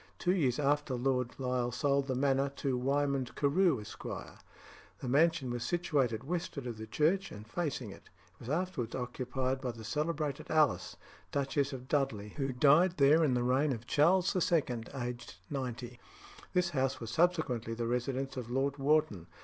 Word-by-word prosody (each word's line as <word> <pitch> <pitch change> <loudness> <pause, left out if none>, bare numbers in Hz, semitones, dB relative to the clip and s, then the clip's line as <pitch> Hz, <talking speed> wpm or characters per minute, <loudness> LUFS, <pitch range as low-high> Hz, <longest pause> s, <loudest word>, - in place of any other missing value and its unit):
Two 180 - +1
years 135 -10 +1
after 145 -2 +1
Lord 125 -1 0
Lisle 125 -2 0
sold 140 +2 +1
the 130 - -1
manor 135 +1 +2
to 135 -3 -1
Wymond 135 0 0
Carew, 150 - +3
Esq. 105 0 -10
The 130 - -10
mansion 145 0 +3
was 120 -1 -3
situated 140 -9 0
westward 160 -3 -3
of 115 -3 -5
the 110 - -6
church 170 - +1
and 105 +1 -10
facing 135 - -3
it. - - -14 0.2
It 90 - -32
was 120 - -9
afterwards 155 -7 -2
occupied 130 +1 -2
by 125 -3 -3
the 115 -1 -10
celebrated 150 +3 -2
Alice, 155 -1 +2 0.4
Duchess 140 0 0
of 130 -1 -7
Dudley, 130 -9 0
who 135 +3 -3
died 150 +8 +4
there 150 +3 +5
in 135 -5 +2
the 120 - +1
reign 135 +4 +2
of 120 -2 -4
Charles 175 +9 +3
II., 170 -7 +2 0.2
aged 120 -3 -5 0.2
ninety. 125 -3 -4 0.5
This 180 -1 +2
house 135 -3 0
was 115 -1 -6
subsequently 125 -8 +1
the 115 0 -2
residence 130 +3 -2
of 120 -2 -5
Lord 135 +3 0
Wharton. 140 - +1
135 Hz, 165 wpm, -32 LUFS, 125-150 Hz, 0.5 s, there